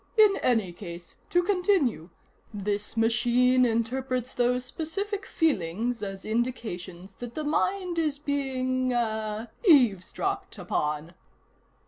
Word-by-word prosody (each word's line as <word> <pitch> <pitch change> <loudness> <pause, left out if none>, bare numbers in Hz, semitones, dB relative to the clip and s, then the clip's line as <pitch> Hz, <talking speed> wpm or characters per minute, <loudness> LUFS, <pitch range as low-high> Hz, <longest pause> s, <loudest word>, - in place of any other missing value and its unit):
"In 425 -2 +6
any 220 -8 +1
case, 170 -2 -9
to 355 0 +3
continue: 360 - +1 0.4
this 205 +1 -3
machine 245 +3 +4
interprets 250 +2 -1
those 250 +1 +1
specific 390 - -4
feelings 230 - 0
as 195 -2 -6
indications 200 -6 -3
that 240 -1 -7
the 310 - -2
mind 360 +3 0
is 305 -3 0
being 260 -3 -1
ah 220 -2 -1 0.2
'eavesdropped' 300 - +3
upon." 160 -4 -2
245 Hz, 105 wpm, -27 LUFS, 210-295 Hz, 0.4 s, In